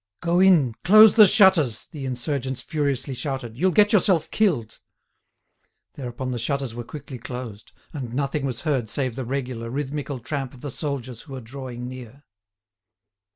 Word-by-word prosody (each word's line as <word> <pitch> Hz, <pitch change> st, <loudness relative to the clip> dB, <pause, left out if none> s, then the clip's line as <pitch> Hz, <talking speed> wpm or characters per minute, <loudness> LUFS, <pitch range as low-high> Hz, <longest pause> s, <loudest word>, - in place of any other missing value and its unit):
"Go 175 Hz, +1 st, +1 dB
in, 170 Hz, -11 st, +5 dB
close 215 Hz, +3 st, +8 dB
the 215 Hz, -3 st, +8 dB
shutters," 185 Hz, -, +4 dB
the 145 Hz, -5 st, -7 dB
insurgents 130 Hz, 0 st, -3 dB
furiously 140 Hz, -3 st, -2 dB
shouted; 130 Hz, -4 st, -4 dB
"you'll 185 Hz, +10 st, +2 dB
get 210 Hz, +4 st, +4 dB
yourself 185 Hz, -5 st, +3 dB
killed." 145 Hz, -, 0 dB, 1.1 s
Thereupon 130 Hz, -1 st, -5 dB
the 120 Hz, -, -3 dB
shutters 135 Hz, +1 st, -2 dB
were 120 Hz, +1 st, -6 dB
quickly 140 Hz, 0 st, -9 dB
closed, 120 Hz, -3 st, -8 dB, 0.2 s
and 130 Hz, -6 st, -5 dB
nothing 140 Hz, +3 st, -2 dB
was 130 Hz, -4 st, -3 dB
heard 135 Hz, -8 st, -1 dB
save 130 Hz, -3 st, -2 dB
the 130 Hz, -1 st, -4 dB
regular, 125 Hz, -3 st, -4 dB
rhythmical 140 Hz, +1 st, -4 dB
tramp 135 Hz, +1 st, -5 dB
of 125 Hz, -, -15 dB
the 145 Hz, -, -5 dB
soldiers 130 Hz, -4 st, -5 dB
who 140 Hz, -, -12 dB
were 130 Hz, -, -5 dB
drawing 125 Hz, 0 st, -7 dB
near. 130 Hz, +2 st, -10 dB
135 Hz, 155 wpm, -24 LUFS, 125-150 Hz, 1.1 s, close